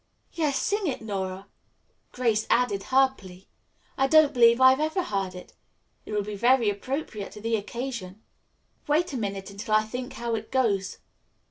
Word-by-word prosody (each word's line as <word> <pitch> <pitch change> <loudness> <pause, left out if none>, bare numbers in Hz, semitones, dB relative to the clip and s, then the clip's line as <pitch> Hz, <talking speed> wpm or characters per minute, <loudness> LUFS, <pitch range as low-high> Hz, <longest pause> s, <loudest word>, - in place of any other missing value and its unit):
"Yes, 300 -5 0
sing 410 +3 -1
it, 255 -6 -3
Nora." 190 -2 -4 0.7
Grace 225 -4 0
added 225 -5 +2
her 265 0 +4
plea. 185 -3 -14 0.5
"I 270 - +4
don't 310 0 +5
believe 235 0 +5
I've 260 +1 +6
ever 315 +4 0
heard 195 - -3
it. 180 - -11 0.5
It - - -6
will 210 -1 0
be 210 +1 -6
very 235 0 +3
appropriate 215 -1 -5
to 210 - -10
the 225 +2 0
occasion." 215 -2 -5 0.7
"Wait 310 +2 +1
a - - -2
minute 200 -3 -4
until 210 +2 -2
I 215 - +4
think 250 +4 -6
how 235 -1 -3
it 220 -1 -4
goes." 205 -8 0
230 Hz, 165 wpm, -26 LUFS, 200-265 Hz, 0.7 s, I've